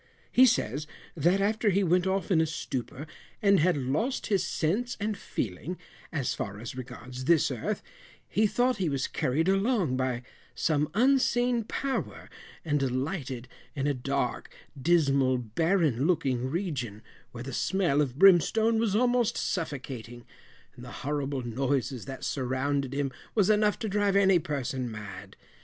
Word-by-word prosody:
He 255 +1 +7
says, 150 - 0 0.3
that 180 +4 +2
after 215 +2 +2
he 200 +1 +2
went 180 +1 +2
off 190 -1 -1
in 165 -3 +5
a 160 - +1
stupor, 140 -2 -5 0.3
and 200 -3 +4
had 175 +1 +3
lost 145 - -1
his 200 -4 +1
sense 215 +10 -1
and 210 +1 -1
feeling, 145 - -4 0.3
as 140 -6 -1
far 100 0 -5
as 120 +3 -7
regards 125 0 -8
this 160 -2 +4
earth, 120 -4 -3 0.4
he 215 +1 +2
thought 245 +3 +1
he 185 -5 0
was 140 -2 -1
carried 155 +7 0
along 195 - +2
by 130 -1 -1 0.3
some 150 -1 +1
unseen 245 -1 +3
power, 270 +3 -3 0.3
and 145 -2 +1
alighted 130 -1 -2 0.3
in 140 -2 -1
a 145 - +2
dark 135 0 -2 0.2
dismal 140 -4 +3
barren 150 - +1
looking 130 -8 0
region, 130 - -3 0.3
where 120 0 -7
the 135 0 -6
smell 175 -2 +1
of 135 -3 -2
brimstone 195 +5 +5
was 220 -3 +1
almost 245 0 +2
suffocating, 130 - -4 0.5
and 120 - -11
the 120 - -9
horrible 140 -2 -2
noises 130 +1 -1
that 135 -1 -7
surrounded 135 +1 -1
him 140 -1 -1 0.2
was 210 -1 +4
enough 210 0 +3
to 220 - -3
drive 205 -1 +1
any 195 -2 +5
person 135 -4 -3
mad. 105 -2 -9
150 Hz, 150 wpm, -28 LUFS, 130-195 Hz, 0.5 s, He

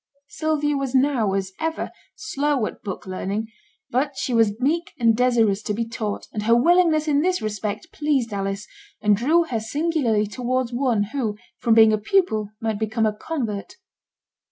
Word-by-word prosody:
Sylvia 300 -2 0
was 270 -1 -2
now, 255 -7 +2
as 190 -1 -2
ever, 320 0 -2 0.2
slow 290 - -1
at - - -7
book 200 -1 -6
learning; 200 +3 -3 0.4
but 275 +4 0
she 255 - -2
was 225 -2 +2
meek 320 +6 0
and 230 -2 +4
desirous 225 -4 +2
to 210 -1 -2
be 230 +1 -2
taught, 220 -3 -4
and 210 - -2
her 230 +2 +4
willingness 320 +3 +4
in 290 -1 +3
this 365 +2 +1
respect 210 0 -4
pleased 275 -7 0
Alice, 195 0 -3 0.3
and 210 -1 +3
drew 305 +11 +3
her 250 -9 -2
singularly 245 -3 0
towards 250 +3 -2
one 240 -4 +1
who, 225 -7 -1 0.2
from 235 -3 +3
being 220 -1 +7
a 215 - +1
pupil, 220 - +1
might 220 -2 -2
become 220 +1 0
a 215 - +1
convert. 230 - -4
235 Hz, 170 wpm, -23 LUFS, 215-290 Hz, 0.4 s, being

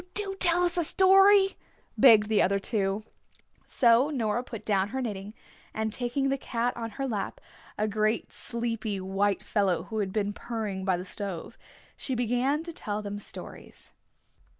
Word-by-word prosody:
"Do 400 -2 -2
tell 350 0 +4
us 350 0 0
a - - +2
story," 390 +3 +6 0.5
begged 220 -5 +7
the 215 -2 +3
other 200 +2 +2
two. 200 0 -1 0.6
So 240 +3 +4
Nora 240 -5 -1
put 225 -4 -9
down 195 -2 +1
her 265 +4 -3
knitting, 210 -3 -5 0.4
and 220 0 -1
taking 260 +3 -1
the 275 0 -1
cat 240 0 -2
on 230 -1 -4
her 270 -1 -2
lap, 210 -5 -3 0.4
a 215 - 0
great 215 +1 0
sleepy 230 -3 -3
white 195 +2 0
fellow 195 -5 0
who 220 - -5
had 195 -2 -1
been 205 0 -1
purring 210 -5 -4
by 185 -2 +2
the 180 - -6
stove, 195 -3 -5 0.4
she 260 - -4
began 245 +6 0
to 335 0 -7
tell 210 -6 -4
them 205 0 -5
stories. - - -10
220 Hz, 165 wpm, -28 LUFS, 205-265 Hz, 0.6 s, begged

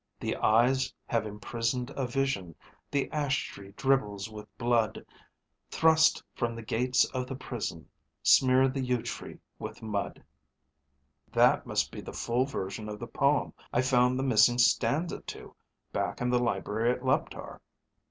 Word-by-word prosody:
_ - - -4
_The - - 0
eyes 125 +5 +3
have 115 -3 -1
imprisoned 115 +4 -3
a 135 -2 -2
vision, 120 - -1 0.3
the 140 -1 0
ash 145 -2 0
tree 100 0 -11
dribbles 110 -6 0
with 105 -1 -9
blood. 115 -3 +1 0.6
Thrust 160 0 +4
from 120 -1 -2
the 115 - -7
gates 125 +3 +2
of 125 -1 -2
the 135 - -5
prison, 115 -11 -5 0.4
smear 130 0 +5
the 135 +1 -2
yew 125 -2 0
tree - - -6 0.2
with - - -7
mud._ 105 -2 -3 1.1
"That - - +4
must - - 0
be - - -7
the - - -9
full 120 +2 0
version 105 -4 -5
of 105 - -5
the 120 - -6
poem 140 +4 +1 0.2
I 120 - +2
found 125 -1 +3
the 130 - -1
missing 120 -1 +5
stanza 125 +7 +2
to - - -9 0.4
back - - -2
in 125 0 0
the 125 - +3
library 115 -1 0
at 125 - -7
Leptar." 130 +1 -1
125 Hz, 155 wpm, -29 LUFS, 110-130 Hz, 1.1 s, smear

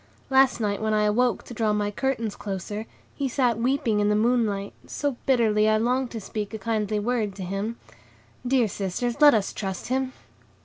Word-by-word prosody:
Last 265 -2 +5
night 205 -2 -1
when 215 0 +1
I 210 - +3
awoke 235 +3 +2
to - - -10
draw 215 -2 +1
my 205 0 0
curtains 230 -2 -2
closer, 205 +2 -5 0.3
he 275 -2 -2
sat 245 -3 +1
weeping 245 -3 +1
in 205 0 +2
the 210 - +3
moonlight, 215 -3 +1
so 285 -3 -2
bitterly, 220 -5 +3
I 215 - +4
longed 250 +3 +1
to 230 - -5
speak 210 +1 -5
a - - -3
kindly 215 -1 -1
word 215 -2 -1
to 195 - -6
him. 195 +5 -3 0.7
Dear 250 -3 +3
sisters, 210 +7 -3
let 290 -4 +8
us 205 -3 0
trust 195 +2 -5
him." 260 0 -1
220 Hz, 185 wpm, -25 LUFS, 210-245 Hz, 0.7 s, let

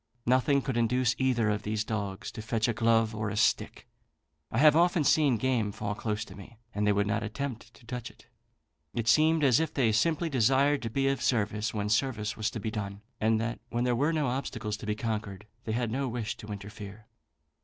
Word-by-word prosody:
Nothing 130 +3 +3
could 130 -3 -2
induce 125 +2 +2
either 120 -5 +2
of 105 0 -1
these 105 0 -2
dogs 100 -3 -4
to - - -7
fetch 110 +1 0
a 120 - +1
glove 115 0 +2
or 110 -1 -2
a 100 - -4
stick: 110 - +1 0.6
I - - -3
have 150 +2 +6
often 170 -1 +3
seen 140 -4 +4
game 115 -3 0
fall 105 0 -3
close 105 0 -3
to - - -12
me, 105 +4 -13 0.2
and 105 +1 0
they - - +5
would 100 0 +2
not 105 +2 0
attempt 115 +2 -5
to - - -19
touch 120 0 -5
it. - - -20 0.7
It 115 -1 -2
seemed 155 +7 +4
as 130 -5 +5
if 160 - -1
they 120 -5 +2
simply 160 +9 +1
desired 135 +1 +3
to 115 - -3
be 135 +4 0
of 135 0 0
service 105 -2 0
when 105 -1 -2
service 105 -1 0
was 110 -1 -1
to 110 - -6
be 110 +1 -3
done; 100 -1 -5 0.2
and 110 0 +2
that 115 0 -3
when 120 +1 -1
there 125 -1 +2
were 145 +7 +2
no 155 -3 0
obstacles 115 -4 -3
to 105 - -9
be 105 - 0
conquered, 105 -3 -4 0.2
they 110 - -2
had 120 -1 -1
no 135 +3 -1
wish 115 -2 -3
to 105 - -10
interfere. 105 0 -8
115 Hz, 220 wpm, -29 LUFS, 105-130 Hz, 0.7 s, have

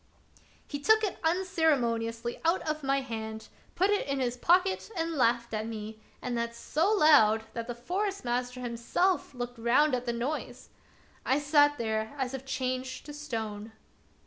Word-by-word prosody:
He 285 - -5
took 440 +8 +4
it 405 - -2
unceremoniously 260 -10 0
out 335 +3 +2
of 310 0 -1
my 275 0 +1
hand, 220 -3 -6 0.3
put 385 +3 +3
it 410 - +1
in 275 -1 -1
his 245 -2 0
pocket, 365 - +2
and 330 0 -1
laughed 235 -4 +1
at 215 0 -2
me, 215 -1 -6 0.2
and 245 -1 -2
that 235 0 -2
so 320 - 0
loud 280 - +5
that 230 0 -4
the 240 - -4
Forest 385 - -3
master 250 +1 -2
himself 250 +8 0
looked 245 -1 -5
round 255 +6 +3
at 250 0 -1
the - - +2
noise. 255 +6 -4 0.5
I 265 - +2
sate 290 0 +4
there 220 +1 -2
as 265 -1 -2
if 270 0 -6
changed 255 -1 -3
to 295 - -8
stone. 225 -7 -5
255 Hz, 165 wpm, -29 LUFS, 235-305 Hz, 0.5 s, loud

